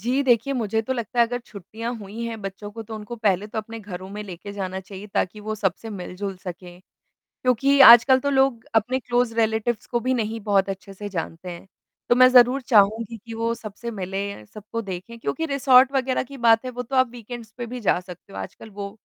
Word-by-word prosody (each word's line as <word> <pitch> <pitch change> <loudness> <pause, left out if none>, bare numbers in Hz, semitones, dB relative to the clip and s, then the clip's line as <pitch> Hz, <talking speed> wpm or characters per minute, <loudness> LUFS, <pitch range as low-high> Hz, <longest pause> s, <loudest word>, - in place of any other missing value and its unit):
जी 250 +6 +1
देखिए, 250 0 +2
मुझे 220 -2 0
तो 260 +4 -2
लगता 240 -1 -4
है 235 - +6
अगर 245 +1 -3
छुट्टियाँ 225 +4 -6
हुई 215 +2 -8
हैं 225 -2 -5
बच्चों 195 +2 -6
को 225 +1 -7
तो 220 0 -8
उनको 215 +2 -7
पहले 205 -3 +1
तो 215 - -5
अपने 225 +1 -6
घरों 190 -2 -8
में 210 +1 -6
लेके 195 +1 -8
जाना 190 -2 -4
चाहिए 195 +1 -10
ताकि 210 +3 -1
वो 215 +1 -4
सबसे 205 +2 -2
मिल-जुल 195 0 -5
सकें 180 -1 -9 0.6
क्योंकि 270 +3 +3
आजकल 240 +2 +9
तो 280 - -1
लोग 265 -4 +2
अपने 245 +4 +2
क्लोज़ 245 -1 0
रिलेटिव्स 220 0 0
को 240 - -1
भी 255 +2 0
नहीं 225 -1 -2
बहुत 200 -2 +2
अच्छे 195 +1 -7
से 205 +2 -6
जानते 180 -1 -5
हैं। 170 +2 -9 0.4
तो - - +5
मैं 255 0 +8
ज़रूर 255 +1 +6
चाहूँगी 220 0 +3
कि 225 +1 -10
वो 230 +1 -1
सबसे 230 +1 -7
पहले 195 - -4
सबको 215 - -6
देखें 195 +4 -7
क्योंकि 325 +7 -2
रिसॉर्ट 270 -2 +5
वग़ैरह 265 -1 0
की 275 +2 -11
बात 230 0 +4
है 255 - -3
वो 250 0 -5
तो 265 +2 -4
आप 255 -1 +4
वीकेंड्स 235 -1 -9
पे 240 - -4
भी 250 +1 -6
जा 200 - +2
सकते 180 -1 -13
हो 95 - -7
आजकल 95 - -8
वो 200 0 -6
225 Hz, 215 wpm, -24 LUFS, 200-245 Hz, 0.6 s, आजकल